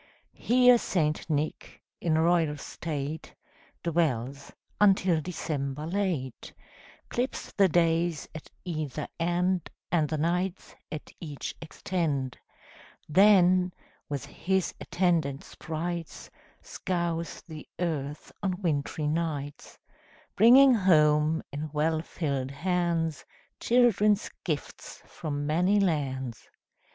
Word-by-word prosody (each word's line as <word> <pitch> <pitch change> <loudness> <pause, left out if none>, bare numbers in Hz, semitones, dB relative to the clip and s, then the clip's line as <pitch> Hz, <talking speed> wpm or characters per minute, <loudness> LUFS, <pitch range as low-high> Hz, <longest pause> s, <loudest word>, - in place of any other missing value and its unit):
Here 250 0 +5
St. 155 -6 -1
Nick, 155 0 -2 0.2
in 160 -2 +1
royal 165 -2 +2
state, 150 +1 -5 0.5
Dwells, 140 -5 -1 0.3
until 190 -5 +4
December 150 -4 -4
late 170 - -3 0.5
Clips 250 +2 -3
the 195 -2 +4
days 165 -1 +1
at 155 - -9 0.2
either 155 -4 -3
end, 175 +1 0 0.2
And 155 -4 +2
the 155 - -1
nights 180 +4 -1 0.2
at 155 - -7
each 150 -5 -6
extend; 155 -5 -2 0.7
Then, 185 0 +5 0.4
with 140 -2 -3
his 190 0 -1
attendant 165 -6 0
sprites, 165 +1 -5 0.3
Scours 170 -2 -3
the 155 -2 -10
earth 150 -4 -3
on 190 -2 -1
wintry 155 -4 -1
nights, 150 -2 -3 0.6
Bringing 255 +5 +8
home, 155 -6 +4
in 150 +2 -4
well 155 +1 +1
filled 140 -6 -3
hands, 165 0 -1 0.4
Children's 215 -4 +3
gifts 155 -5 -5
from 145 -2 -4
many 180 +7 +3
lands. 135 - -2
165 Hz, 100 wpm, -28 LUFS, 150-180 Hz, 0.7 s, Bringing